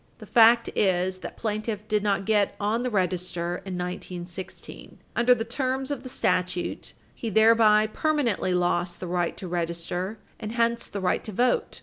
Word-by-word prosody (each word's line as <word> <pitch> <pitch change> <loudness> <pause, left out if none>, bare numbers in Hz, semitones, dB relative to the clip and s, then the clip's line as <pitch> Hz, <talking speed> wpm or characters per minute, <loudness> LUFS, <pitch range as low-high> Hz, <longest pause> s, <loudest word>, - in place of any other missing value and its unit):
The - - -11
fact 230 0 +6
is 185 -1 +1
that - - -8
plaintiff 215 -1 -3
did 210 -2 +1
not 200 -1 0
get 210 -1 +2
on 215 +3 0
the 250 - -1
register 180 -3 -1
in 190 -1 -6
1916. 180 +1 -7 0.2
Under 245 +1 +5
the 225 -1 -3
terms 260 +3 -2
of 285 - -3
the 255 - -8
statute, 180 -5 -1 0.2
he 230 - -5
thereby 220 0 +5
permanently 235 -7 0
lost 175 0 0
the - - -5
right 175 -1 -1
to 185 - -6
register, 175 +3 -3 0.2
and 215 -1 -5
hence 235 0 +1
the 200 - -5
right 180 - 0
to 215 - -5
vote. 245 +5 0
205 Hz, 165 wpm, -26 LUFS, 180-230 Hz, 0.2 s, fact